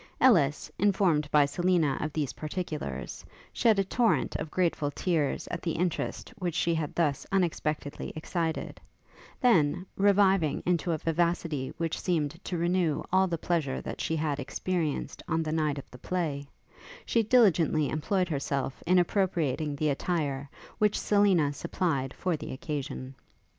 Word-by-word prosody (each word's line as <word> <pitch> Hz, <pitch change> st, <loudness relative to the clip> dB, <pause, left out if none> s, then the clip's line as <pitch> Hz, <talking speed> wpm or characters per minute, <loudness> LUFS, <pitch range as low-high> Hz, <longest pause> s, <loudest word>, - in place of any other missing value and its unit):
Ellis, 165 Hz, -, +4 dB
informed 180 Hz, -7 st, +2 dB
by 150 Hz, -1 st, +5 dB
Selina 165 Hz, -1 st, +1 dB
of 155 Hz, -, -2 dB
these 145 Hz, -3 st, -2 dB
particulars, 155 Hz, -1 st, -5 dB, 0.3 s
shed 225 Hz, -4 st, +3 dB
a 195 Hz, -, +3 dB
torrent 230 Hz, +4 st, +1 dB
of 155 Hz, -, -5 dB
grateful 165 Hz, -4 st, 0 dB
tears 155 Hz, -1 st, -1 dB
at 170 Hz, -, -4 dB
the 165 Hz, -, -1 dB
interest 175 Hz, +6 st, -2 dB
which 175 Hz, -3 st, -2 dB
she 170 Hz, -1 st, +2 dB
had 160 Hz, -3 st, -2 dB
thus 150 Hz, -5 st, +1 dB
unexpectedly 155 Hz, -6 st, -1 dB
excited; 160 Hz, 0 st, -3 dB, 0.6 s
then, 180 Hz, -, +3 dB
reviving 195 Hz, -6 st, +3 dB
into 175 Hz, 0 st, +1 dB
a 160 Hz, -, +1 dB
vivacity 165 Hz, -4 st, -1 dB
which 165 Hz, -1 st, -2 dB
seemed 165 Hz, -1 st, -1 dB
to 180 Hz, -, -2 dB
renew 170 Hz, -2 st, +1 dB
all 190 Hz, 0 st, +5 dB
the 170 Hz, -2 st, -2 dB
pleasure 155 Hz, -5 st, -1 dB
that -, -, -6 dB
she 160 Hz, -, -1 dB
had 150 Hz, -2 st, -1 dB
experienced 160 Hz, +3 st, -2 dB
on 165 Hz, 0 st, 0 dB
the 155 Hz, -, -3 dB
night 155 Hz, -2 st, 0 dB
of 140 Hz, -, -7 dB
the 125 Hz, -, -12 dB
play, 150 Hz, -5 st, -2 dB, 0.6 s
she 230 Hz, -, +2 dB
diligently 185 Hz, -, +4 dB
employed 180 Hz, +5 st, 0 dB
herself 140 Hz, -3 st, -2 dB
in 185 Hz, +1 st, +5 dB
appropriating 165 Hz, -6 st, +1 dB
the 150 Hz, +1 st, 0 dB
attire 140 Hz, -2 st, -1 dB, 0.3 s
which 210 Hz, -1 st, +2 dB
Selina 190 Hz, -8 st, +3 dB
supplied 140 Hz, -4 st, -1 dB
for 180 Hz, -3 st, -1 dB
the 155 Hz, -, -7 dB
occasion. 135 Hz, -1 st, -5 dB
165 Hz, 150 wpm, -29 LUFS, 145-180 Hz, 0.6 s, by